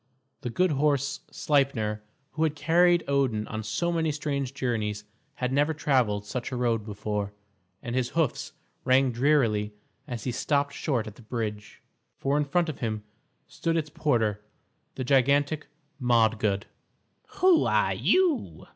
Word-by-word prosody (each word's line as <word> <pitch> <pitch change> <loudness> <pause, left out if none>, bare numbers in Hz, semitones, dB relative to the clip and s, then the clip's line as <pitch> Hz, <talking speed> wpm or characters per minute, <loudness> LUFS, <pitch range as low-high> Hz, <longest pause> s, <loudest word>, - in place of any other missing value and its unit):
The 120 - -3
good 180 +9 +2
horse 140 -1 +1
Sleipner, 130 -8 0 0.3
who 160 - -5
had 155 -2 +2
carried 175 +3 +4
Odin 135 -6 +1
on 110 - -4
so 110 +12 -1
many 160 -2 +1
strange 140 -3 -2
journeys, 105 -5 -2 0.3
had 125 0 -2
never 145 +3 +2
travelled 120 -9 +1
such 120 +5 -4
a - - -3
road 120 -3 0
before, 105 -1 -3 0.5
and 120 0 -4
his 125 -1 0
hoofs 160 -7 0 0.3
rang 130 0 +4
drearily 115 -5 +2 0.3
as 120 -3 -5
he 125 - -1
stopped 140 +3 0
short 125 -8 -1
at 110 -2 -9
the - - -14
bridge, 110 -3 -5 0.3
for 140 +1 0
in 150 0 +2
front 170 +4 +1
of 155 - -5
him 110 -3 -3 0.4
stood 165 0 -2
its 155 -2 -2
porter, 110 -10 0 0.5
the 130 - -3
gigantic 140 +3 +2 0.3
Modgud. 110 -4 +2 0.7
"Who 370 -3 +5
are - - +2
you?" 300 - +1
130 Hz, 145 wpm, -27 LUFS, 110-150 Hz, 0.7 s, Who